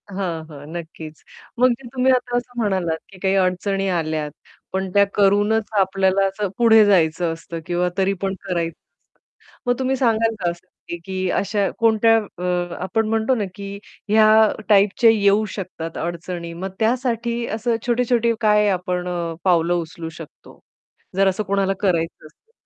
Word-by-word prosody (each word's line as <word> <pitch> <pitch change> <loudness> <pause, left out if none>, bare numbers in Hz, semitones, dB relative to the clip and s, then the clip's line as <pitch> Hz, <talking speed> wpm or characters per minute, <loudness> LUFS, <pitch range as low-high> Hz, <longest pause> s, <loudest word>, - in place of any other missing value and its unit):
हां, 180 -5 -4
हां. 145 -2 -11
नक्कीच. 160 -1 -9 0.4
मग 250 0 +5 0.2
तुम्ही 260 0 +3
आता 245 -1 0
असं 245 0 -5
म्हणालात, 185 -6 0
की 195 - -15
काही 190 +1 +1
अडचणी 195 +1 0
आल्यात, 155 -4 -2 0.4
पण 190 0 -1
त्या 200 0 +5
करूनच 205 +2 +2
आपल्याला 190 0 +2
असं 195 +1 -3
पुढे 225 -2 +6
जायचं 170 -3 +2
असतं 165 0 -8
किंवा 175 +1 0
तरी 195 0 +2
पण 195 -1 -1
करायचं 170 -4 -2
असतं. - - -32
मग 245 - +2
तुम्ही 260 0 0
सांगाल 230 -3 +2
का 175 - +2
असं, 170 0 -14 0.4
की 185 -1 -2
अशा 200 0 0
कोणत्या 225 0 +4
अ, 180 -4 -3
आपण 225 +3 0
म्हणतो 225 +3 +1
ना, 220 - -1
की 200 -1 -7 0.3
ह्या 215 +1 +5 0.4
टाइपचे 205 +3 +5
येऊ 205 0 +3
शकतात 170 -4 -6
अडचणी. 170 0 -5
मग 185 +3 -5
त्यासाठी 235 0 0
असं 230 +1 0
छोटे-छोटे 240 -1 +2
काय 210 -1 +4
आपण 180 -1 -2
अ, 170 -2 -3
पावलं 175 -2 +3
उचलू 165 -1 -4
शकतो? 160 - -13 0.6
जर 195 0 +3
असं 190 +3 0
कोणाला 195 0 0
करायचं 170 -5 -1
असेल. 445 - -27
195 Hz, 155 wpm, -21 LUFS, 175-220 Hz, 0.6 s, पुढे